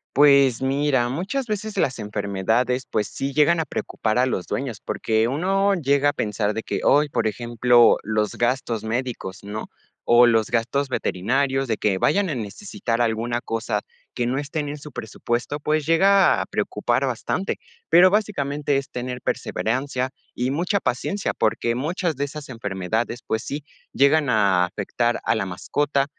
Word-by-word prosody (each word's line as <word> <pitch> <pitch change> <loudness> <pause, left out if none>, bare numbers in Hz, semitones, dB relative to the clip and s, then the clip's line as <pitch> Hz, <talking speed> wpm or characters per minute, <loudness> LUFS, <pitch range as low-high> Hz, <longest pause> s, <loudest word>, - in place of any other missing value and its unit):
Pues 140 -3 +5
mira, 135 -2 +1
muchas 195 - -3
veces 215 0 -3
las 130 - 0
enfermedades, 110 +4 -1
pues, 105 -2 0
sí 135 +6 -4
llegan 160 +3 +4
a 160 - 0
preocupar 110 -3 -2
a 130 - +3
los 95 -8 -2
dueños, 125 -6 -4
porque 110 0 0
uno 195 +8 +1
llega 140 -4 +2
a - - -2
pensar 105 -4 -1
de 110 - -3
que, - - -3
oy, 145 +1 +4
por - - -1
ejemplo, 120 +2 +4
los 105 0 -1
gastos 120 -2 -1
médicos, 115 -4 -3
¿no? 105 +2 -6 0.3
O 120 +1 +6
los 115 -2 +2
gastos 130 +4 0
veterinarios 135 +5 0
de 110 - -1
que 100 -3 +1
vayan 195 - +2
a 150 - -2
necesitar 120 - -3
alguna 120 +1 0
cosa 115 -2 -2 0.3
que 120 -1 -1
no 130 +2 -1
estén 145 0 -3
en 150 - -5
su 150 +1 -11
presupuesto, 120 +5 -3
pues, 155 +1 0
llega 195 +4 +5
a - - -11
preocupar - - -1
bastante. 190 - -2 0.3
Pero, 180 +3 +7
básicamente, 145 -9 0
es 140 0 -4
tener 125 0 -4
perseverancia 130 +2 -2 0.2
y 125 +2 -1
mucha 180 +8 0
paciencia, 195 +9 -2
porque 115 +1 0
muchas 165 +5 -2
de 140 - -1
esas 145 -1 -9
enfermedades, 110 +1 -3
pues 110 - -1
sí, 145 +1 -5 0.3
llegan 140 +1 +3
a 100 -6 +3
afectar 120 +5 -1
a 110 - +2
la 110 -4 -2
mascota 135 +10 0
130 Hz, 165 wpm, -23 LUFS, 110-145 Hz, 0.3 s, Pero